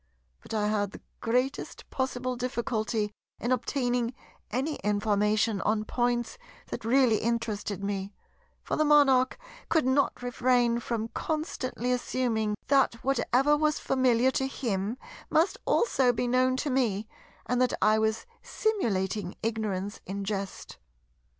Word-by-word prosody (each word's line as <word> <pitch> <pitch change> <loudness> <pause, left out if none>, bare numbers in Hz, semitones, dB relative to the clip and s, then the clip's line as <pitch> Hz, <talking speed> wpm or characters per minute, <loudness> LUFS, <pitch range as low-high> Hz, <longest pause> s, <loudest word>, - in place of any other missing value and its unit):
But - - -13
I 210 -1 +1
had 205 -2 0
the - - -10 0.2
greatest 250 +4 -1
possible 255 -1 -2
difficulty 230 -3 -1 0.3
in 240 - -2
obtaining 245 -1 0 0.3
any 270 +7 -1
information 210 +1 +1
on 215 0 0
points 240 - -1 0.3
that - - -4
really 240 -1 +4
interested 215 -4 -2
me; 200 -1 -2 0.5
for - - -2
the 310 - +3
Monarch 275 -4 +5 0.3
could 320 -4 +3
not 260 -1 +1
refrain 245 -1 +2
from 230 -1 -3
constantly 260 -6 -2
assuming 235 -4 0
that 270 -3 +3
whatever 275 +1 +3
was 305 0 +1
familiar 255 -1 +2
to 265 0 0
him 225 -4 -2 0.3
must 325 +4 +2
also 265 - +3
be 245 +1 -1
known 255 +1 +2
to 290 +1 -1
me 220 -5 0 0.4
and 250 0 0
that 255 - +2
I 215 +1 +4
was 220 0 0 0.2
simulating 205 - -1
ignorance 210 -3 -2
in 200 +2 -4
jest. 195 -1 -5
240 Hz, 130 wpm, -28 LUFS, 215-260 Hz, 0.5 s, Monarch